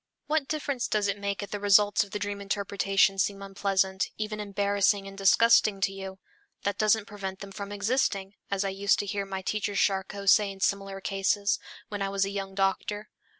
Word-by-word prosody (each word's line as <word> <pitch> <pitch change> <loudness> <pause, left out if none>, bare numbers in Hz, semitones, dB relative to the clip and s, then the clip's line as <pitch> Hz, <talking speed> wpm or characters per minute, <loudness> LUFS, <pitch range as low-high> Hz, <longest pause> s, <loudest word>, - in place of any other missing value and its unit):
What 300 -2 0
difference 285 -5 -2
does 210 -1 +1
it 200 0 -2
make 200 0 -2
if 200 - -8
the 205 - -3
results 205 0 +4
of 205 - -12
the 210 - -3
dream 205 0 -4
interpretation 195 -1 +1
seem 200 0 0
unpleasant, 195 -1 0
even 215 0 -3
embarrassing 200 -1 +1
and 195 - -9
disgusting 200 +1 +4
to 195 0 0
you? 190 -1 -7 0.5
"That 200 0 -2
doesn't 215 0 +3
prevent 195 -2 -6
them 200 0 -9
from 200 +1 -7
existing," 205 -2 0 0.2
as 200 0 0
I - - 0
used 195 +1 +2
to - - -2
hear 200 0 -3
my 190 -1 -5
teacher 205 +1 -2
Charcot 195 +1 0
say 205 +1 +6
in 195 - -11
similar 195 0 -1
cases, 200 +1 0 0.3
when 205 -1 -5
I 195 - 0
was 195 0 +1
a 195 - -4
young 195 -1 -5
doctor. 200 +2 -1
200 Hz, 195 wpm, -28 LUFS, 195-205 Hz, 0.5 s, say